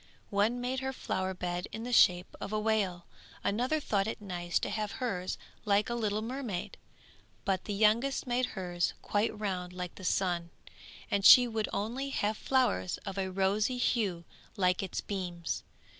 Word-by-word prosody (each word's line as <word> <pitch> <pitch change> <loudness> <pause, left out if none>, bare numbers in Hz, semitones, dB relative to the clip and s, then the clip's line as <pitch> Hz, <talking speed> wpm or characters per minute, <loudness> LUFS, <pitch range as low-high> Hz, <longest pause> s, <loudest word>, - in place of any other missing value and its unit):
One 210 +4 +2
made 250 +2 -1
her 265 0 -3
flower 190 -6 -2
bed 180 0 -3
in 225 - -5
the 245 +1 -3
shape 180 -4 +5
of - - -4
a 215 - 0
whale; 205 -5 0 0.4
another 250 +9 +1
thought 205 -8 0
it 225 - -3
nice 175 -4 -2
to - - -2
have 210 -2 -2
hers 190 -8 -2 0.3
like 205 +1 +2
a - - +1
little 215 -2 -1
mermaid; 230 -7 -4 0.7
but 190 -2 0
the 210 - -3
youngest 225 +6 +3
made 250 0 +1
hers 175 -2 -1
quite 210 +1 0
round 180 -4 -3
like 180 -1 -5
the 190 - -12
sun, 175 -2 0 0.6
and 200 -1 +1
she 245 +4 +10
would 220 -2 -2
only 235 +7 -2
have 215 -5 0
flowers 210 - +1
of 195 0 -4
a 190 -1 -1
rosy 195 +6 +1
hue 200 -9 0 0.3
like 180 -2 +2
its 190 -2 -3
beams. 175 -4 -3
205 Hz, 170 wpm, -31 LUFS, 180-230 Hz, 0.7 s, she